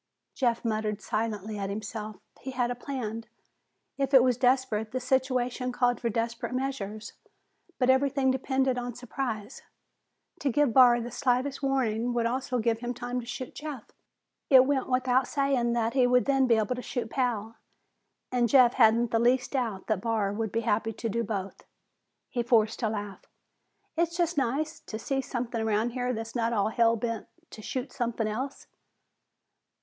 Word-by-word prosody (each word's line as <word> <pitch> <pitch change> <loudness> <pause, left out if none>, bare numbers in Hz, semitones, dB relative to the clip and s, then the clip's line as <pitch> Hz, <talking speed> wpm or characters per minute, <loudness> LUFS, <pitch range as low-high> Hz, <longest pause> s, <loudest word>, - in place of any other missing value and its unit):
Jeff 240 -3 0
muttered 215 -2 -1
silently 215 -2 -3
at 195 -1 -3
himself. 215 +1 -5 0.2
He 265 - -7
had 245 -2 -1
a - - -2
plan. 235 -4 -5 0.7
If 275 0 +2
it 255 - +8
was 250 -1 +3
desperate, 250 -3 +1
the 255 - 0
situation 255 -1 0
called 245 0 +1
for 235 - 0
desperate 230 +2 -2
measures. 220 -6 -4 0.6
But 255 0 +4
everything 265 0 +2
depended 265 -1 0
on 245 -1 -5
surprise. 245 -2 -5 0.8
To 280 - 0
give 275 -1 +2
Barr 245 -1 +7
the 240 +1 -6
slightest 260 +2 0
warning 245 -4 0
would 235 -1 +1
also 255 +1 -1
give 225 -1 +1
him 245 +1 -4
time 245 +1 -3
to 235 - -8
shoot 245 +1 -6
Jeff. 295 -6 -7 0.6
It 260 -2 +8
went 270 -2 0
without 255 0 +2
saying 275 -4 +1
that 230 -1 0
he 255 -2 +4
would 250 0 +3
then 270 -2 +3
be 235 - +5
able 220 +2 +1
to 250 - -5
shoot 240 -3 -4
Pal, 230 -4 -1 0.7
and 245 -2 +2
Jeff 250 -1 +6
hadn't 230 0 +4
the 225 - +2
least 250 +2 +2
doubt 230 -8 -2
that 215 -4 -1
Barr 215 -3 0
would 220 -1 -2
be 230 - 0
happy 225 0 0
to 230 +2 -4
do 235 +3 -1
both. 200 -3 -5 0.6
He 245 - -2
forced 230 -2 +2
a 220 - +1
laugh. 205 -2 -5 0.7
"It's 340 +1 0
just 345 -1 +1
nice 285 +4 -1
to 220 - -7
see 270 +4 -1
something 240 -3 -3
around 220 +2 +1
here 250 0 -1
that's 225 -1 -5
not 230 -2 +1
hell 230 -1 +4
bent 230 0 -3 0.2
to 215 - -10
shoot 255 +4 -4
something 235 -2 -1
else." 255 +6 -4
240 Hz, 170 wpm, -28 LUFS, 225-260 Hz, 0.8 s, it